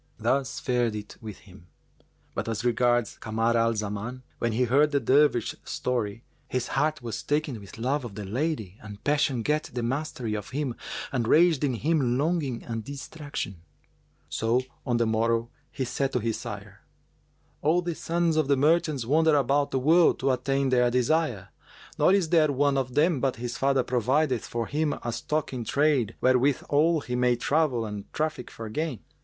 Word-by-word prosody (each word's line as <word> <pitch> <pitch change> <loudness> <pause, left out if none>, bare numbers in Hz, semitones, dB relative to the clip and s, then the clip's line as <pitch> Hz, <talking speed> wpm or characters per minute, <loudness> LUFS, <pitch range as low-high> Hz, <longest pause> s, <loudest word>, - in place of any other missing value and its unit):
Thus 130 +4 0
fared 120 -3 0
it 105 -1 -7
with 110 -3 -8
him; 95 -2 -16 0.7
but - - -3
as 115 +2 -3
regards 120 -1 +1
Kamar 115 +2 0
al 115 0 +2
Zaman, 105 +4 -4 0.2
when 115 - 0
he 125 +3 +2
heard 140 +5 +4
the 145 -1 +1
Dervish's 135 -1 +2
story, 115 -3 -2 0.2
his 125 -1 -2
heart 150 0 0
was 115 -2 -4
taken 145 -5 -1
with 100 +1 -12
love 130 +5 -1
of 115 -5 -7
the 105 -1 -6
lady 110 - -3
and 105 -1 -10
passion 145 -5 +1
gat 150 +3 0
the 120 -1 -3
mastery 130 -3 -2
of 105 -2 -4
him 140 -2 -2 0.4
and 120 -4 -1
raged 160 -1 +4
in 135 -4 +1
him 135 -2 +1
longing 145 -5 -1
and 115 -2 -4
distraction; 140 - -6 0.7
so, 115 +3 +1 0.3
on 120 -1 +2
the 120 - +2
morrow, 115 +1 +1 0.2
he 130 - -3
said 135 +2 -1
to 125 - +2
his 115 -1 -2
sire, - - -8 0.8
"All 165 +4 +2
the 170 0 -2
sons 165 0 0
of 155 -3 +2
the 140 -1 +3
merchants 155 -3 +2
wander 155 +4 +4
about 140 +1 +2
the - - -1
world 160 +6 +4
to 135 +1 +2
attain 135 +1 0
their 125 -1 +3
desire, 125 - 0 0.5
nor - - +5
is 190 -4 +2
there 155 -3 +4
one 140 +1 +2
of 130 -2 -2
them 155 0 +3
but 135 0 0
his 120 +1 -5
father 135 -1 +2
provideth 130 +2 +1
for 115 -1 -2
him 150 +2 0
a 120 - -2
stock 150 +2 -2
in 125 -2 -3
trade 140 -3 +1
wherewithal 145 +5 +3
he 125 -3 -4
may 125 0 +3
travel 130 -2 +1
and 105 -1 -7
traffic 155 -5 -2
for 115 - -8
gain. 150 +3 -3
130 Hz, 180 wpm, -27 LUFS, 115-150 Hz, 0.8 s, nor